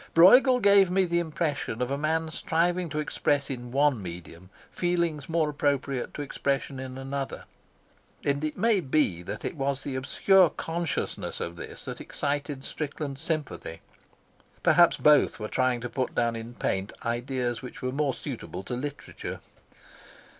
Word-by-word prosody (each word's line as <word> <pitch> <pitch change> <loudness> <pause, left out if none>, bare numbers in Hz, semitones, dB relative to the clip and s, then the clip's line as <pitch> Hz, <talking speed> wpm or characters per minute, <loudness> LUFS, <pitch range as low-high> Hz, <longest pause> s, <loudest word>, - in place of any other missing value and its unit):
Brueghel 250 +9 +8
gave 200 -3 +6
me 190 +1 +3
the 170 0 +1
impression 155 -7 -2
of 125 +1 -1
a - - +1
man 160 +2 0
striving 170 +2 0
to 150 - -4
express 145 -2 0
in 120 -2 -6
one 140 -3 +3
medium 85 0 -9 0.2
feelings 170 -5 -1
more 165 -1 +2
appropriate 140 -3 -1
to 145 - -3
expression 140 -1 -2
in 130 0 -6
another, 135 +1 -4 0.8
and 140 +1 +1
it 155 - -2
may 225 -3 +3
be 135 - +1
that 100 +4 -6
it - - -3
was 140 -1 -1
the 140 - -4
obscure 170 +7 +4
consciousness 165 0 -3
of 85 - -4
this - - -9
that - - -6
excited 145 -1 -3
Strickland's 145 -2 -5
sympathy. 155 - -4 0.8
Perhaps 175 -1 +6
both 150 -5 +4
were 105 - -3
trying 130 0 +1
to 125 - -3
put 130 +1 -3
down 120 -1 +1
in 115 +1 -7
paint 95 -2 -1
ideas 120 0 -1
which 125 -1 -9
were 130 - 0
more 140 -1 0
suitable 95 - -6
to 110 - -5
literature. 140 +3 -5
140 Hz, 155 wpm, -27 LUFS, 125-160 Hz, 0.8 s, Brueghel